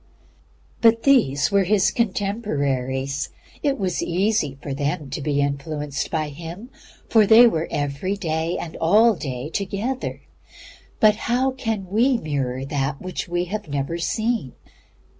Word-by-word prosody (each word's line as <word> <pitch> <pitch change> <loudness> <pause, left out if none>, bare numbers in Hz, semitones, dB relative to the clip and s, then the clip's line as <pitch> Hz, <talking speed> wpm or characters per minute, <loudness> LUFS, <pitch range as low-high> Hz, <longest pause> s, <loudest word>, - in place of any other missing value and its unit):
But 230 0 +5
these 210 - +3
were 200 -1 +4
His 195 0 +3
contemporaries. 140 - -1 0.3
It 280 -2 +1
was 185 -4 -1
easy 175 -6 0
for 140 - -5
them 145 +1 -2
to 145 - -3
be 145 0 0
influenced 145 +1 -2
by 155 -2 -1
Him, 170 - -9 0.4
for 220 -3 +4
they 230 +3 +9
were 165 -8 +1
every 145 +7 -2
day 165 -3 -2
and 165 - -6
all 215 +8 +5
the - - -10
day 130 0 -4
together. 205 +9 -3 0.8
But 215 -1 +6
how 255 +3 +2
can 225 -6 -3
we 235 +7 +3
mirror 135 - -3
that 135 0 -2
which 185 0 -5
we 175 +1 -1
have 215 -4 -3
never 145 +4 -2
seen? 220 - -1
170 Hz, 140 wpm, -23 LUFS, 145-215 Hz, 0.8 s, they